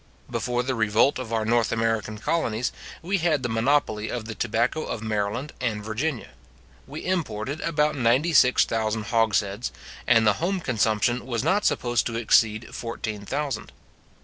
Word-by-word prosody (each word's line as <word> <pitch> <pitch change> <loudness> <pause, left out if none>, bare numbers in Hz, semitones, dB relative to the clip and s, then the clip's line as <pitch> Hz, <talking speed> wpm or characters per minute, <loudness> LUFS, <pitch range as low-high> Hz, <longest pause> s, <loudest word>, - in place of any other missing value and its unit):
Before 125 0 -1
the 130 +1 -1
revolt 110 +5 +2
of 125 -3 -6
our 110 -1 0
North 115 -1 +2
American 110 -1 -1
colonies, 120 -2 -1 0.3
we 190 +3 0
had 160 -5 +1
the 120 - -1
monopoly 115 -2 +1
of 120 -3 -4
the 115 - -5
tobacco 115 +8 0
of 110 - -5
Maryland 110 +5 -2
and 110 -4 -1
Virginia. 120 +5 -3 0.6
We 145 +3 -7
imported 150 - -2
about 150 -1 +1
ninety 130 +6 +2
six 125 -3 +5
thousand 110 -1 -1
hogsheads, 110 -1 +1 0.4
and 115 -2 +5
the 105 - +5
home 190 +3 0
consumption 120 - 0
was 120 -2 -1
not 190 +7 +2
supposed 120 -1 +1
to 115 - -4
exceed 110 -1 +2
fourteen 110 -3 -5
thousand. 140 -4 -3
115 Hz, 155 wpm, -25 LUFS, 110-140 Hz, 0.6 s, six